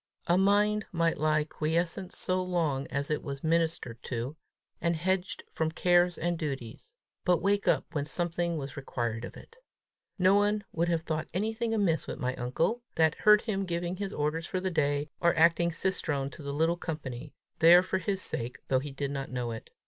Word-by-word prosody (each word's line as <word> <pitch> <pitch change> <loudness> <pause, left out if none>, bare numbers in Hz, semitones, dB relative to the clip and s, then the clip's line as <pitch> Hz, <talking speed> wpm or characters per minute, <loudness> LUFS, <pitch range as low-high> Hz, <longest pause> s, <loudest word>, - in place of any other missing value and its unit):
A 175 - +3
mind 205 +2 +3
might 165 -2 +1
lie 155 0 +2
quiescent 165 +4 -2
so 185 0 0
long 165 -7 -1
as 140 +2 -2
it 150 - 0
was 140 -2 -6
ministered 160 -7 0
to, 125 +4 -4 0.5
and 170 0 +1
hedged 185 +3 -1
from 160 -1 0
cares 175 +1 +3
and 175 -1 -1
duties, 135 - -6 0.3
but 180 -2 +3
wake 200 +1 +1
up - - +3
when 145 -3 -2
something 170 +1 -1
was 140 -2 -6
required 120 -5 -3
of - - -10
it! 465 - -15 0.6
No 185 0 +5
one 205 +1 +2
would 170 +1 0
have 165 -2 0
thought 155 -2 -2
anything 220 +4 -1
amiss 200 -7 +1
with - - -5
my 125 -3 -1
uncle, 130 - 0
that 160 -1 +4
heard 210 0 +5
him 195 -4 -2
giving 175 0 -2
his 200 0 -3
orders 155 +2 -1
for 185 - -2
the 190 0 -2
day, 145 -2 0
or 170 0 +3
acting 170 +1 +4
cicerone 160 -6 -1
to 150 - -11
the 140 -1 -4
little 165 +4 +1
company 150 -5 -6 0.2
there 175 +2 +8
for 185 0 -1
his 190 +1 -2
sake, 120 +2 -4
though 130 - +3
he 145 +2 -5
did 140 +1 -3
not 135 -1 -4
know 125 -2 -3
it. 115 - -7
165 Hz, 190 wpm, -29 LUFS, 145-185 Hz, 0.6 s, there